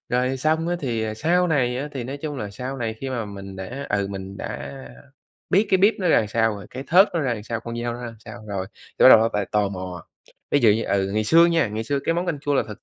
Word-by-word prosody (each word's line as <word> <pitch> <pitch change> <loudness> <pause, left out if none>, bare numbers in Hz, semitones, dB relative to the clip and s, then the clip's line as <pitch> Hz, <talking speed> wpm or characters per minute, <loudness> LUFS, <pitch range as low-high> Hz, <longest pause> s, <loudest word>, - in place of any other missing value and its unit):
rồi 125 +2 0
xong 160 +5 0
á 175 - 0
thì 110 -5 -2
sau 175 +7 +2
này 125 -5 +1
á, 145 - -4
thì 130 -4 -4
nói 135 +3 -5
chung 145 0 -5
là 105 -4 -5
sau 125 +6 -6
này 115 -3 -3
khi 135 -1 -4
mà 120 -3 -2
mình 100 -2 -9
đã, 125 +9 -6
ừ, 100 -1 0
mình 95 0 -7
đã 70 -6 -6 0.8
biết 205 +4 +4
cái 190 - +4
bếp 205 +4 +5
nó 185 - 0
ra - - +5
làm 110 - 0
sao 110 0 +1
rồi, 100 - -10
cái 130 +2 -7
thớt 190 +5 +6
nó 170 - +1
ra 130 -4 0
làm 105 -2 -5
sao, 115 0 -4
con 120 0 -5
dao 120 0 -2
nó 120 - -8
ra 120 -1 -6
sao 110 0 -10
rồi, 95 -2 -3
thì - - -6
bắt - - +11
đầu - - +10
nó 115 +1 +2
lại 105 -1 -1
tò 105 -1 +2
mò. 90 -3 -7 0.5
Ví 145 - +4
dụ 115 -3 +6
như, 110 +2 +1
ừ, 95 -1 0
ngày 110 0 +1
xưa 165 +8 +6
nha, 165 -4 +2
ngày 110 +2 -4
xưa 140 +3 0
cái 165 - +1
món 175 +2 -1
canh 165 -4 -2
chua 145 -1 0
là - - +3
thực 105 +2 -10
120 Hz, 290 wpm, -23 LUFS, 105-145 Hz, 0.8 s, bắt